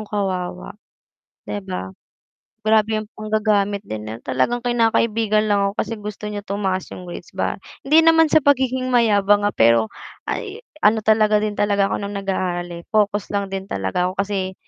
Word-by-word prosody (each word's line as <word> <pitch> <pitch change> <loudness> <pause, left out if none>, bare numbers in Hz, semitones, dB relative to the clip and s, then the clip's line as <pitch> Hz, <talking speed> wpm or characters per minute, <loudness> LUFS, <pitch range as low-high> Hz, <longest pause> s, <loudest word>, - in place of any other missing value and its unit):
'yong 215 - -7
kawawa, 185 - -3 0.7
'di 105 - -3
ba, 90 +1 -4 0.8
grabe 220 0 +3
ang 215 - -9
panggagamit 210 -2 0
din, 110 0 -6 0.2
talagang 235 - 0
kinakaibigan 225 -2 +2
lang 200 -1 +2
ako - - -13
kasi 230 - -3
gusto 210 0 -6
niya 205 -1 -6
tumaas 190 -2 -1
yung 180 - -9
grades 175 - -9
ba, - - -1 0.3
hindi 310 +4 +6
naman 325 -1 +5
sa - - +6
pagiging 260 -2 +2
mayabang, 205 -4 +4
ah, 205 - -1
pero 115 -1 +4 0.4
ay 425 +1 -5 0.2
ano 215 +1 +5
talaga 215 -1 +4
din 210 -1 -1
talaga 200 -1 +2
ako - - 0
nung 200 +1 -5
nag-aaral, 185 -3 -2
eh, 170 0 -8
focus 205 -1 +1
lang 200 -1 -1
din 195 0 -4
talaga 95 - -1
ako 190 - -3
kasi 195 -2 -3
205 Hz, 170 wpm, -21 LUFS, 190-220 Hz, 0.8 s, hindi